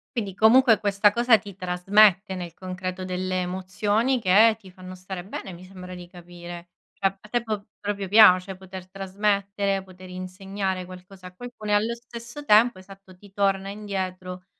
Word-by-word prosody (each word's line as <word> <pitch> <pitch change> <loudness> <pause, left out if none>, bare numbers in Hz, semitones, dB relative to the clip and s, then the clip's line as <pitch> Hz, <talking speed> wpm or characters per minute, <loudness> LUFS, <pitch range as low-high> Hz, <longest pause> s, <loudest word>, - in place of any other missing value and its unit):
Quindi, 205 -5 -3
comunque, 225 +2 +5
questa 205 0 +3
cosa 235 +1 +4
ti 200 -2 -11
trasmette 190 +2 +3
nel 175 -2 -7
concreto 185 0 -5
delle 185 0 -2
emozioni 205 +7 0
che 220 +2 +5
ti 190 -4 -15
fanno 185 0 -11
stare 185 0 -7
bene 190 0 -7
mi 175 +1 -12
sembra 185 -1 -10
di 180 -1 -9
capire. 175 -1 -11 0.2
Cioè, 195 - -6
a 210 - -17
te 240 +1 0
po 215 -3 -4
proprio 200 -1 -3
piace 190 -2 +6
poter 190 0 -10
trasmettere, 195 0 -1
poter 185 0 -14
insegnare 185 +1 -4
qualcosa 185 +1 -12
a 180 - -15
qualcuno 240 -1 -9
e, - - +2
allo 220 +3 +1
stesso 235 +3 -10
tempo, 220 -2 +5
esatto, 190 0 -15
ti 200 +2 -18
torna 195 -1 0
indietro 185 -3 -5
195 Hz, 165 wpm, -25 LUFS, 185-210 Hz, 0.2 s, piace